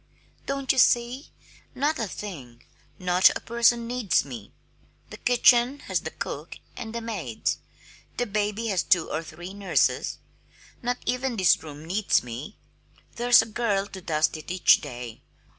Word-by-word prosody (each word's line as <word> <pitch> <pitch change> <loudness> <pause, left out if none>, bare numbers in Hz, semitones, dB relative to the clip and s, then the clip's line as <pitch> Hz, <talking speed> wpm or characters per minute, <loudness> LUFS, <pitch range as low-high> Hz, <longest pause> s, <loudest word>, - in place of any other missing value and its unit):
Don't 275 -1 0
you 265 - +1
see? 240 +4 +2 0.5
Not 295 +4 0
a 225 - -1
thing, 135 - -8 0.3
not 180 0 +5
a - - -2
person 235 0 +2
needs 235 - +1
me. 120 -7 -9 0.6
The - - -8
kitchen 245 +2 +4
has - - -1
the - - -5
cook - - -6 0.2
and 225 0 -7
the 235 - -3
maids. 190 - -3 0.6
The 245 - 0
baby 210 +1 -1
has 190 -4 +1
two 175 -1 +2
or 155 - -1
three 175 +3 -9
nurses. 200 -1 +1 0.6
Not 245 +1 -1
even 250 -1 -1
this 185 -3 +4
room 150 0 -10
needs 195 +5 +1
me 125 - -8 0.6
there's 240 0 +6
a - - -8
girl 215 -3 -1
to 190 - -9
dust 155 -2 0
it 155 - -10
each 180 0 +5
day. 120 -5 -8
205 Hz, 155 wpm, -26 LUFS, 160-240 Hz, 0.6 s, there's